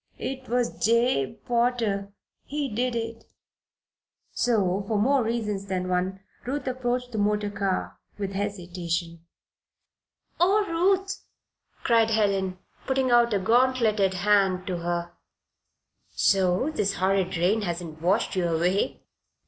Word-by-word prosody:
"It 260 -2 -5
was 245 0 -1
Jabe 230 - +2
Potter 235 -5 0 0.3
he 290 0 -3
did 245 +2 0
it." 230 0 -4 1.1
So, 200 -5 +1
for 215 - 0
more 265 +6 +3
reasons 210 -4 -2
than 185 -1 -2
one, 185 +1 -1 0.2
Ruth 270 +2 -3
approached 250 -1 -2
the 220 - -3
motor 210 0 +1
car 195 -2 -2 0.2
with 200 -2 -3
hesitation. 175 -4 -3 1.2
"Oh, 400 +4 +4
Ruth!" 385 +3 +1 0.6
cried 230 -2 +4
Helen, 195 -4 +1 0.3
putting 265 -1 +1
out 240 0 +5
a 205 - +2
gauntleted 225 -2 +2
hand 195 -1 +2
to 185 -3 -2
her. 170 0 -3 1.0
"So 190 +8 +2
this 200 -8 -1
horrid 190 0 +1
rain 190 +6 +2
has 175 -4 -2
not 160 -3 -9
washed 195 +6 +1
you 180 -2 +1
away? 175 +4 0
205 Hz, 125 wpm, -26 LUFS, 185-245 Hz, 1.2 s, out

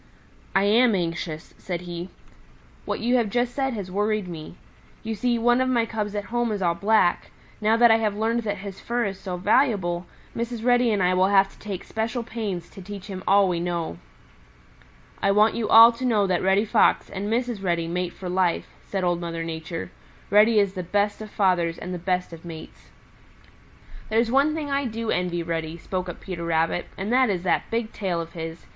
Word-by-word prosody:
"I 195 - +4
am 225 +2 +4
anxious," 165 -2 -4
said 175 -2 -4
he. 175 0 -6 0.8
"What - - -3
you 245 +3 +2
have 230 -4 +1
just 245 +2 0
said 270 -2 -1
has 195 -3 -6
worried 210 0 0
me. 165 -1 -8 0.5
You 225 0 -3
see, 235 +3 0
one 240 +2 +3
of 260 - +1
my 235 -3 +2
cubs 215 -2 -4
at 205 - -2
home 240 -1 +1
is 205 - -2
all 175 -3 +2
black. 200 -1 +2 0.3
Now 220 +2 +3
that 235 -1 +6
I 225 - +6
have 210 -2 -1
learned 225 +2 0
that 205 -2 -3
his 195 0 -8
fur 240 0 -1
is 195 -1 -4
so 185 -2 -5
valuable, 190 -4 +1 0.3
Mrs. 235 -1 -4
Reddy 245 -1 +4
and 200 -3 +1
I 180 +1 +3
will 185 +1 +3
have 195 0 +4
to - - -21
take 200 -4 -6
special 225 +2 -3
pains 205 -7 -4
to 195 - -11
teach 195 0 -8
him 190 -2 -7
all 200 0 +5
we 175 -2 -1
know." 170 - -3 1.2
"I 195 - +2
want 210 +2 +4
you 220 -3 -2
all 230 +1 +9
to 235 +2 -8
know 220 -5 +2
that 185 -2 0
Reddy 190 +3 +3
Fox - - +3
and 200 +2 -5
Mrs. 240 -3 -1
Reddy 170 -2 0
mate 180 +1 -2
for 185 - -8
life," 180 -1 0
said 195 -2 -3
Old 175 -1 0
Mother 165 -1 -4
Nature. 160 - -5 0.4
"Reddy 215 +2 +5
is 200 -2 +3
the 185 - -4
best 205 +4 0
of 215 - -7
fathers 180 -5 +1
and 180 +1 -6
the 180 - -4
best 180 0 -1
of 165 - -11
mates." 165 -2 -10 1.2
"There's 225 +1 +2
one 280 +4 +3
thing 295 -3 -4
I 275 0 0
do 230 -1 -3
envy 175 -1 -1
Reddy," 165 -1 -3
spoke 185 +1 -4
up 175 - -7
Peter 180 -3 -6
Rabbit, 165 +1 0
"and 200 +5 -2
that 255 -2 +4
is 180 -3 -1
that 180 - 0
big 230 -1 -2
tail 185 -4 -2
of 165 0 -6
his. 165 0 -7
200 Hz, 210 wpm, -24 LUFS, 175-225 Hz, 1.2 s, all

